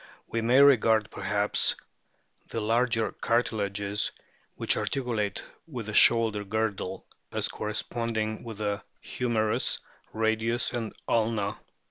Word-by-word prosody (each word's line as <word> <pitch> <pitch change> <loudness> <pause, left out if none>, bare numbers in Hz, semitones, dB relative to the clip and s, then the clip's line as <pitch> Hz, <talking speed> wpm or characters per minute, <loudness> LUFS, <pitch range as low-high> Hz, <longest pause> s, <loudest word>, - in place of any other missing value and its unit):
We 115 - -2
may 120 +4 +4
regard, 110 -6 +4
perhaps, 105 0 +1 0.7
the 115 - -4
larger 115 +1 +1
cartilages 105 -3 0 0.4
which - - +3
articulate 115 -6 -2 0.2
with 125 -8 -6
the 110 - -5
shoulder 110 -3 +5
girdle 100 -2 -2 0.3
as - - 0
corresponding 110 0 -2
with 115 -3 -7
the 105 -1 -2 0.2
humerus, 110 -3 0 0.3
radius, 110 +2 0
and 115 -3 -4
ulna. 110 -3 0
110 Hz, 105 wpm, -28 LUFS, 105-115 Hz, 0.7 s, shoulder